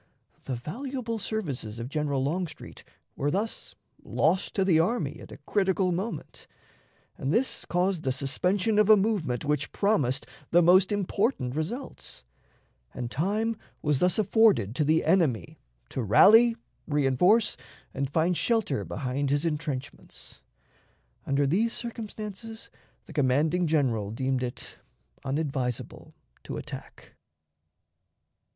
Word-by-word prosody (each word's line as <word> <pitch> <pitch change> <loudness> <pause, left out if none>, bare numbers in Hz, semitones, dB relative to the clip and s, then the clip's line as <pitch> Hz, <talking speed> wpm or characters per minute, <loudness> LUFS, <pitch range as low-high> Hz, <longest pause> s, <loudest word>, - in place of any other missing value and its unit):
The 130 - -2
valuable 230 - -4
services 150 - -3
of 115 +1 -5
General 140 -1 -1
Longstreet 165 +3 -4 0.3
were 145 - -1
thus 205 +8 -3 0.3
lost 180 +4 0
to 195 - +2
the 170 -4 +4
army 205 +9 0
at - - -12
a - - -9
critical 190 -2 +1
moment, 185 -1 -5 0.7
and 135 - -1
this 245 +8 +1
caused 180 0 0
the 135 - 0
suspension 180 - +1
of 210 0 +4
a 215 - +9
movement 190 - 0
which 150 -1 -1
promised 140 - +1 0.2
the 175 +1 +5
most 185 +4 +5
important 200 - 0
results; 175 - -5 0.7
and 120 -1 -4
time 210 - 0 0.3
was 150 -3 +1
thus 180 0 +2
afforded 215 - +3
to 140 - 0
the 155 +2 +2
enemy 160 - +1 0.3
to 130 - -3
rally, 225 - +6 0.3
reënforce, 150 - +3 0.4
and 135 0 -2
find 165 +4 +1
shelter 220 - 0
behind 140 +1 -2
his 145 +3 +1
intrenchments. 150 -4 -5 0.9
Under 140 +1 +2
these 210 +11 +1
circumstances 220 -1 -7 0.3
the - - -12
commanding 150 +5 +2
General 125 -10 +1
deemed 130 +3 -1
it 125 -1 -6 0.5
unadvisable 135 -4 -3 0.3
to - - -5
attack. - - -9
165 Hz, 120 wpm, -27 LUFS, 135-210 Hz, 0.9 s, a